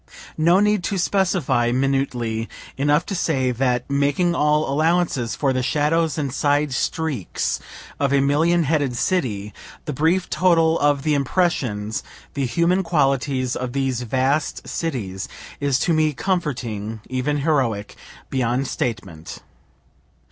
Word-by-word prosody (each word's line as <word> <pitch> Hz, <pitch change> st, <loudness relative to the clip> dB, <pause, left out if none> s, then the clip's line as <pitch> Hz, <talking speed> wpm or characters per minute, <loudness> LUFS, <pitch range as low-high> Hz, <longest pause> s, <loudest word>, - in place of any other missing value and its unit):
No 170 Hz, +4 st, +4 dB
need 210 Hz, -2 st, +2 dB
to 200 Hz, -, -1 dB
specify 175 Hz, -10 st, +1 dB
minutely 125 Hz, -4 st, -1 dB, 0.3 s
enough 145 Hz, +3 st, +2 dB
to -, -, -4 dB
say 135 Hz, -8 st, 0 dB
that 125 Hz, 0 st, 0 dB
(making 140 Hz, +5 st, +1 dB
all 150 Hz, -1 st, +2 dB
allowances 155 Hz, -6 st, +1 dB
for 135 Hz, -3 st, +1 dB
the 130 Hz, -, 0 dB
shadows 155 Hz, +4 st, +1 dB
and 140 Hz, -4 st, -2 dB
side 145 Hz, -1 st, +1 dB
streaks 140 Hz, -, -2 dB, 0.4 s
of 140 Hz, -1 st, +1 dB
a 140 Hz, -, +4 dB
million 160 Hz, +5 st, +3 dB
headed 140 Hz, -4 st, 0 dB
city) 110 Hz, -, -1 dB, 0.3 s
the 150 Hz, -, -3 dB
brief 165 Hz, +7 st, +1 dB
total 165 Hz, -3 st, +3 dB
of 145 Hz, -1 st, +2 dB
the 155 Hz, -, +1 dB
impressions, 130 Hz, -, 0 dB, 0.3 s
the 140 Hz, -3 st, -1 dB
human 170 Hz, +8 st, +2 dB
qualities, 135 Hz, -6 st, 0 dB
of 125 Hz, -1 st, -4 dB
these 135 Hz, -3 st, -1 dB
vast 130 Hz, +5 st, -1 dB
cities, 105 Hz, -, -4 dB, 0.3 s
is 140 Hz, -3 st, +1 dB
to 165 Hz, +5 st, +1 dB
me 155 Hz, -1 st, +2 dB
comforting, 120 Hz, -, -3 dB
even 130 Hz, +3 st, -1 dB
heroic, 130 Hz, -9 st, 0 dB, 0.4 s
beyond 125 Hz, +1 st, 0 dB
statement. 95 Hz, -9 st, -5 dB
140 Hz, 130 wpm, -22 LUFS, 125-160 Hz, 0.4 s, No